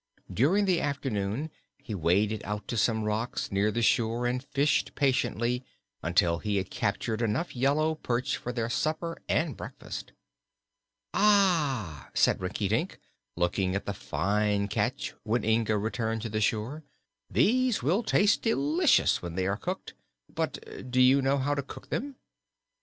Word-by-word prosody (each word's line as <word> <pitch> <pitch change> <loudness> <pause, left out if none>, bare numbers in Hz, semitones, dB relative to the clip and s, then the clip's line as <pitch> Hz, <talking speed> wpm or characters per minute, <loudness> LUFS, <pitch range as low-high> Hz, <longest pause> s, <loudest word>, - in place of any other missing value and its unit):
During 180 - +3
the 185 -3 +2
afternoon 135 -1 -2 0.3
he 115 - -8
waded 100 +4 +1
out 105 0 -4
to - - -2
some 110 0 +1
rocks 110 +3 -2
near 100 +2 +2
the 115 +2 -1
shore 115 +2 +2
and 125 +1 -1
fished 145 +1 +1
patiently 125 -2 +1 0.4
until 85 0 +2
he 105 0 -1
had 95 -1 -3
captured 110 +3 -1
enough 115 +10 -1
yellow 145 +5 +2
perch 125 -5 -1
for 125 - -5
their 120 -2 -2
supper 155 +6 -1
and - - +1
breakfast. - - -8 1.0
"Ah," 155 - +2
said - - +3
Rinkitink, - - -1 0.4
looking 90 +2 0
at 100 - -3
the 100 - -2
fine 100 +1 0
catch - - -1
when 120 +3 0
Inga 110 -1 +2
returned 110 +1 -2
to 115 - -3
the 110 0 -1
shore; 115 +9 -1 0.5
"these 250 - +2
will 175 - +2
taste 205 -2 +3
delicious 300 +8 +3
when 85 -1 -6
they 95 0 0
are 100 +1 +1
cooked; 180 - -5 0.4
but 160 -5 -5
do 130 +1 +1
you 130 +2 +6
know 135 +1 +2
how 140 +2 0
to 145 - -1
cook 140 - -11
them?" 280 +2 -3
120 Hz, 150 wpm, -28 LUFS, 105-150 Hz, 1.0 s, you